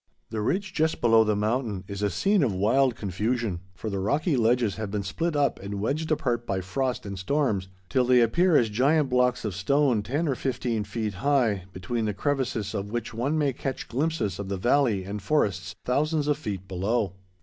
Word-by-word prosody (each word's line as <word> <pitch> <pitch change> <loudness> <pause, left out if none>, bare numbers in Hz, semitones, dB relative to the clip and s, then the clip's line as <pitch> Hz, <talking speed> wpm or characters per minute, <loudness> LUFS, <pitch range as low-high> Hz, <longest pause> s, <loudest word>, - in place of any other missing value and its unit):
The 110 -2 -2
ridge 190 - -1
just 160 -1 +1
below 115 -1 +5
the 105 -1 +1
summit 110 -3 -1
is 100 0 -5
a 105 - +2
scene 195 - +2
of 130 -7 +2
wild 120 +6 +3
confusion, 105 0 -2 0.2
for 110 - -6
the 100 - -2
rocky 145 - +1
ledges 115 -3 +2
have 110 -2 -4
been 100 0 -2
split 165 - -2
up 145 -1 +1
and 100 +1 -5
wedged 145 +10 -1
apart 120 -6 0
by 95 - 0
frost 125 +8 -2
and 100 -2 -5
storms 105 -3 0 0.2
till 125 +8 +2
they 125 0 +5
appear 165 +9 +4
as 115 -3 +2
giant 140 +6 +3
blocks 125 -1 +2
of 105 - -2
stone 125 +4 +2
ten 140 +10 -1
or 140 - +2
fifteen 120 -4 -2
feet 105 0 -3
high, 115 -4 +1
between 110 +5 -3
the 105 -2 -2
crevices 130 -6 -1
of 100 +1 -3
which 120 +1 -4
one 130 +7 0
may 145 -3 +1
catch 135 +1 -4
glimpses 125 - -1
of 100 -1 -5
the 100 - -2
valley 120 -2 +2
and 100 +2 -5
forests 95 - 0
thousands 150 +3 +1
of 150 - +3
feet 100 - -5
below. 100 +2 -1
115 Hz, 200 wpm, -26 LUFS, 100-140 Hz, 0.2 s, below